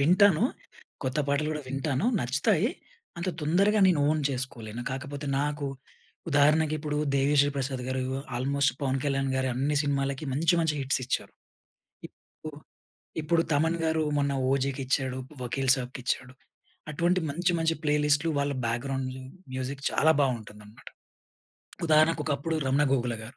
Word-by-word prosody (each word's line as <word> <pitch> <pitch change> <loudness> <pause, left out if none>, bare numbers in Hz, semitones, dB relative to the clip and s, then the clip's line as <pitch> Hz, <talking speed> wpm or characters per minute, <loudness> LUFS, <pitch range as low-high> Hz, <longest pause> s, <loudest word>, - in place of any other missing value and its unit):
వింటాను, 185 +6 +5 0.6
కొత్త 130 +2 -2
పాటలు 145 +2 +1
గూడా 150 -1 -3
వింటాను, 135 - -1
నచ్చుతాయి. 155 - +2 0.5
అంత 175 +2 -2
తొందరగా 195 +8 +3
నేను 175 -5 +3
ఓన్ 155 0 +1
చేసుకోలేను. 120 -3 -5
కాకపోతే 140 +2 -5
నాకు 145 0 -2 0.6
ఉదాహరణకిప్పుడు 150 0 +2 0.2
'దేవిశ్రీ 140 +1 +3
ప్రసాద్‌' 130 -1 -2
గారు 130 0 -1 0.4
ఆల్‌మోస్ట్ 140 +2 +1
పవన్ 135 -1 0
కళ్యాణ్‌ 135 -1 0
గారి 130 0 0
అన్ని 140 +4 0
సినిమాలకి 140 0 -1
మంచి 165 +6 +2
మంచి 160 -2 +1
హిట్సిచ్చారు. 130 -2 -1 0.8
ఇప్పుడు. 155 -2 -12 0.6
ఇప్పుడు, 165 +2 +2
'తమన్‌' 160 +3 +2
గారు 160 0 +1
మొన్న 140 -1 +1 0.2
ఓజీకి 135 0 0
ఇచ్చాడు, 130 -1 0 0.2
వకీల్ 135 +2 -1
సాబ్‌కిచ్చాడు. 125 0 -4 0.6
అటువంటి 175 +4 +1
మంచి 175 +5 0
మంచి 165 0 +1
ప్లే 150 -1 +2
లిస్టులు 150 +2 +2
వాళ్ళ 140 0 0
బ్యాక్‌గ్రౌండ్లు 130 +2 -3 0.3
మ్యూజిక్ 130 +2 -4
చాలా 160 +1 +4
బాగుంటుందన్నమాట. 110 -5 -4 1.0
ఉదాహరణకు, 155 0 +4
ఒకప్పుడు 155 +2 -1
'రమణ 135 +2 +3
గోగుల‌' 120 -3 0
గారు. 115 +4 -11
140 Hz, 130 wpm, -28 LUFS, 130-155 Hz, 1.0 s, వింటాను